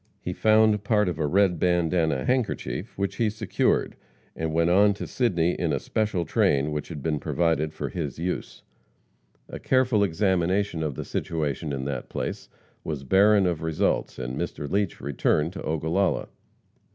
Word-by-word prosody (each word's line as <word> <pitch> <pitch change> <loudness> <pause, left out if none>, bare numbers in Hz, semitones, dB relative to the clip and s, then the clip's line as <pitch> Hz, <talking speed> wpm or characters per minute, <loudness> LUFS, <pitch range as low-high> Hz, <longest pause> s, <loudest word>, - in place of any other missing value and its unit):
He 90 - -4
found 110 0 +3
part 105 -1 +2
of 85 -3 -3
a 75 - +1
red 95 0 +2
bandana 85 -5 +1
handkerchief, 130 -2 -2
which 100 0 -2
he 115 -2 +2
secured, 110 -1 0 0.4
and 80 -1 -2
went 85 +2 +2
on 100 +2 +5
to - - -5
Sidney 90 -9 +1
in 85 -2 -1
a 70 - +1
special 100 +2 -1
train 70 0 +2
which 75 0 -3
had 75 -5 -7
been 75 -2 0
provided 80 -2 0
for - - -5
his 75 -6 -4
use. 90 +3 -4 0.8
A - - -8
careful 125 -5 +2
examination 95 -1 +1
of 75 -4 -2
the - - -5
situation 75 -2 -2
in 65 -1 -3
that 70 -3 -4
place - - -4 0.3
was 75 -3 -4
barren 100 +6 +4
of 85 -3 -1
results, 80 -1 0
and 65 0 -4
Mr. 75 - -4
Leach 100 +3 -1
returned 75 +4 0
to - - -7
Ogallala. 80 +5 0
85 Hz, 165 wpm, -25 LUFS, 75-100 Hz, 0.8 s, on